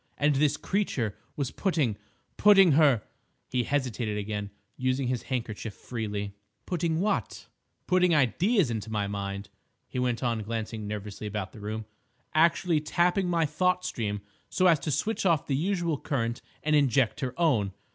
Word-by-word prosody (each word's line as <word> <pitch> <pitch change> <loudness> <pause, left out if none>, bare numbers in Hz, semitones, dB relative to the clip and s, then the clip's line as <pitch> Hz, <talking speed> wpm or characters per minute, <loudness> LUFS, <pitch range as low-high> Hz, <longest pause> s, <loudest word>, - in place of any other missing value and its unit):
And 150 +1 +3
this 145 0 +3
creature 135 - -1 0.2
was 140 -3 -2
putting—putting 165 - +3
her—" 140 -7 +5 0.4
He 125 - 0
hesitated 125 -6 -1
again, 105 -1 -3 0.3
using 130 0 0
his 125 -1 -1
handkerchief 115 -4 -4
freely. 105 -4 -4 0.3
"Putting 170 -2 0
what?" 210 +2 -1 0.4
"—putting 180 -2 +4
ideas 165 - +3
into 110 -1 -4
my 105 -2 -1
mind," 100 0 -4 0.4
he 125 - -4
went 125 -1 0
on 115 -3 0
glancing 110 0 -4
nervously 105 0 -5
about 105 -2 -4
the - - -12
room. 110 +1 -4 0.5
"Actually 165 0 +3
tapping 175 +4 +1
my 170 -2 +2
thought 180 +4 +1
stream 105 -3 -2 0.3
so 185 - +1
as 165 -4 +6
to 155 - -4
switch 180 +11 0
off 165 -6 +3
the 135 - 0
usual 170 -1 0
current 115 -3 -2 0.2
and 155 0 +2
inject 135 -4 +3
her 130 +3 -4
own. 120 - +2
130 Hz, 150 wpm, -28 LUFS, 110-165 Hz, 0.5 s, as